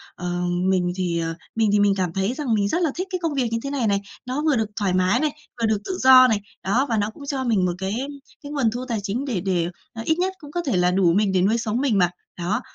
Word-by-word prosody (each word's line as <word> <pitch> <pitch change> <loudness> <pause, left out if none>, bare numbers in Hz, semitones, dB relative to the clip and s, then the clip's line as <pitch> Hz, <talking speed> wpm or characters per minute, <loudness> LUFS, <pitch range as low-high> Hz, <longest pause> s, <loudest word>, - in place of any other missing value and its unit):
ờ, 175 0 -3 0.3
mình 180 -2 +2
thì, 175 -3 -1
ờ 165 0 -2 0.2
mình 225 -2 +2
thì 205 - +3
mình 205 -1 +4
cảm 180 -3 -1
thấy 195 +5 0
rằng 260 -5 -1
mình 200 -1 +2
rất 340 - 0
là 320 - +2
thích 370 +2 -3
cái 365 - -1
công 330 -3 -1
việc 265 -4 +1
như 230 - 0
thế 275 - -3
này 270 -5 0
này. 200 -1 +1 0.2
Nó 255 +3 -2
vừa 305 -2 +2
được 220 -2 +1
thoải 195 -3 +1
mái 185 +5 +3
này, 305 0 +1 0.3
vừa - - +3
được 215 - +2
tự 375 - -3
do 260 -2 +8
này, 220 -4 +1 0.2
đó, 240 +9 +2
và 225 - +1
nó 205 0 0
cũng 285 - -11
cho 275 -2 -2
mình 220 -7 +2
một 180 - +1
cái 190 +1 -3 0.5
cái 285 - -7
nguồn 270 -7 +1
thu 245 +3 -4
tài 230 -4 -1
chính 225 +7 -2
để 230 -10 -2
để 175 -3 0 0.2
à 225 - -6
ít 320 - +2
nhất 375 +1 0
cũng 290 -2 -11
có 350 - -1
thể 255 -10 +1
là 180 0 +3
đủ 180 -2 +3
mình 200 +1 +2
để 185 - +2
nuôi 210 +5 +3
sống 235 +2 -1
mình 250 -8 +2
mà, 180 -2 +4 0.3
đó. 180 +4 -1
220 Hz, 290 wpm, -23 LUFS, 190-265 Hz, 0.5 s, do